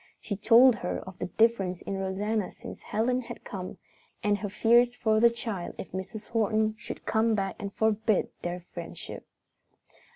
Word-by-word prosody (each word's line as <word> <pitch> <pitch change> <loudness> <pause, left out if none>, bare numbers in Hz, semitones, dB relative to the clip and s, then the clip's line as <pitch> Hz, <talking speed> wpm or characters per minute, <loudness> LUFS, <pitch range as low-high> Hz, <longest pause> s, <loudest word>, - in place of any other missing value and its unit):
She 205 - -4
told 230 +5 +7
her 180 - -2
of 190 -1 -10
the - - -2
difference 195 -4 +1
in 200 - -3
Rosanna 200 +2 -1
since - - -10
Helen 250 +4 0
had 235 - -9
come, 185 -3 -6 0.5
and 205 -1 +3
her 205 - -3
fears 235 +4 +4
for 220 -2 +2
the 235 +1 +7
child 225 -6 -5
if - - -7
Mrs. 205 +3 -6
Horton 220 -1 +1
should - - -8
come 220 0 +2
back 195 -1 -1
and 200 - -4
forbid 220 -1 +1
their 175 +1 -3
friendship. - - -8
215 Hz, 165 wpm, -28 LUFS, 195-230 Hz, 0.5 s, told